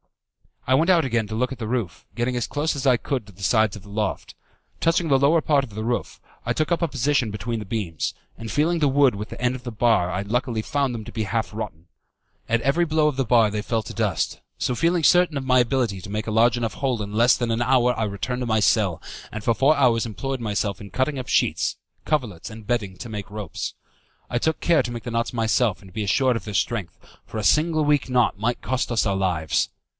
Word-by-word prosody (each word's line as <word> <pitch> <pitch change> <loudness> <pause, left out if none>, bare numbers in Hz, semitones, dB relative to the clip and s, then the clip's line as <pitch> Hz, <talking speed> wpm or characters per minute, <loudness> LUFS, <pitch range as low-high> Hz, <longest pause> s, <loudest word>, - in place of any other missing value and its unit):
I 130 - +2
went 160 +7 +3
out 170 -5 +5
again 115 -4 0
to 110 - -5
look 125 +3 0
at 135 - -7
the 110 - -4
roof, 115 -7 -3
getting 120 +1 -1
as 120 - -1
close 150 +2 -1
as 140 0 -2
I 125 -2 +5
could 125 0 -3
to 100 - -14
the 100 +1 -12
sides 110 +2 +3
of 105 - -10
the 100 - -14
loft. 105 -1 -3 0.5
Touching 165 +1 +2
the 135 - +5
lower 155 +4 +4
part 145 -3 +2
of 125 - -8
the 110 - -3
roof, 120 +1 -2 0.3
I - - +1
took 155 +2 -1
up 170 - +1
a 170 - +2
position 140 -3 +1
between 110 +2 -3
the 105 - -6
beams, 95 -6 -3 0.2
and 115 -1 -6
feeling 165 +4 +1
the 150 - +3
wood 135 -2 +4
with 105 +1 -6
the - - -9
end 125 0 +2
of 125 - -9
the 120 - -5
bar 110 -5 +2
I 95 - -1
luckily 115 +2 -1
found 140 0 -1
them 110 - -5
to - - -8
be 110 - -2
half 110 +2 -2
rotten. 85 -6 -6 0.6
At 115 0 +1
every 140 +8 +2
blow 155 -1 +2
of 150 - 0
the 135 -1 0
bar 115 -2 +4
they 105 0 -2
fell 110 +1 -1
to - - -8
dust, - - -1 0.2
so - - -1
feeling 165 +6 +1
certain 175 -1 +4
of 135 - -4
my 130 -1 +4
ability 120 -5 +1
to 100 - -9
make 105 +1 -3
a 110 - -3
large 115 +2 +4
enough 115 -2 -2
hole 130 -5 -1
in 100 0 -7
less 120 +4 +5
than 120 -2 -1
a 115 +1 +1
hour 125 -1 +3
I - - +1
returned 115 +5 -3
to - - -1
my 110 -2 +2
cell, 100 -5 +2 0.3
and 110 0 -6
for 115 - +3
four 135 +7 +4
hours 120 -4 +3
employed 135 +4 -4
myself 105 -3 -2
in 100 - -9
cutting 130 +4 -1
up 125 - -6
sheets, - - +1 0.3
coverlets, 120 - -2
and 110 -1 -11
bedding, 105 -5 -2
to 120 - -8
make 105 0 -6
ropes. 105 -3 -5 0.5
I 120 - 0
took 160 +3 0
care 165 -4 +4
to 120 - -4
make 120 -2 -6
the 120 - -5
knots 115 +1 -1
myself 115 -2 +1
and 95 - -14
to - - -19
be 110 +1 -2
assured 125 +5 +2
of 115 - -5
their 105 - -6
strength, 105 -7 -1 0.3
for - - -7
a 110 - -2
single 155 - +3
weak 145 -3 +2
knot 125 -5 +2
might 115 +3 -1
cost 130 +2 -1
us 115 -2 +2
our 100 -2 +1
lives. 90 -5 0
120 Hz, 255 wpm, -23 LUFS, 105-135 Hz, 0.6 s, out